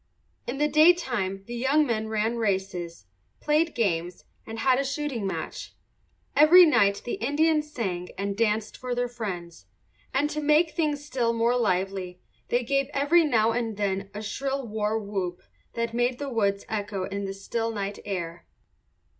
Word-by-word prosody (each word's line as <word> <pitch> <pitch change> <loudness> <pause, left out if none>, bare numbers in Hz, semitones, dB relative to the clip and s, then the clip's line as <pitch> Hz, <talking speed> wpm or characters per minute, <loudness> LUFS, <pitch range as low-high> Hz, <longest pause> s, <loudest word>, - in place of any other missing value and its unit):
In 245 +3 -3
the 295 +1 +2
daytime 265 - +3
the 240 - -7
young 270 +6 +2
men 220 -4 -1
ran 220 +2 0
races, 190 - -2 0.3
played 305 +2 +1
games, 175 -6 -1 0.2
and 225 0 -6
had 255 +2 +3
a - - +1
shooting 275 -6 -2
match. 190 - -5 0.6
Every 340 +5 +9
night 205 -10 +3
the 240 - -4
Indians 300 +3 +2
sang 180 -9 -3
and 200 +1 -2
danced 215 0 0
for 250 -1 -3
their 245 0 0
friends; 190 -8 -6 0.4
and 275 +3 +1
to 305 - -2
make 300 +3 +3
things 295 -3 -1
still 245 -5 0
more 230 +1 +2
lively 190 -4 -1 0.3
they 245 +1 +1
gave 275 +2 0
every 295 +5 +4
now 230 -7 +3
and 225 -3 -2
then 195 -1 -1
a 210 +2 -7
shrill 270 +4 -3
war 215 0 -1
whoop 195 -4 -4 0.3
that 230 0 -2
made 245 +1 +1
the 285 0 -4
woods 200 -5 0
echo 205 -3 -3
in 200 +1 -4
the 195 - -4
still 225 +3 -2
night 200 -2 -4
air. 175 -4 -5
230 Hz, 165 wpm, -26 LUFS, 200-275 Hz, 0.6 s, Every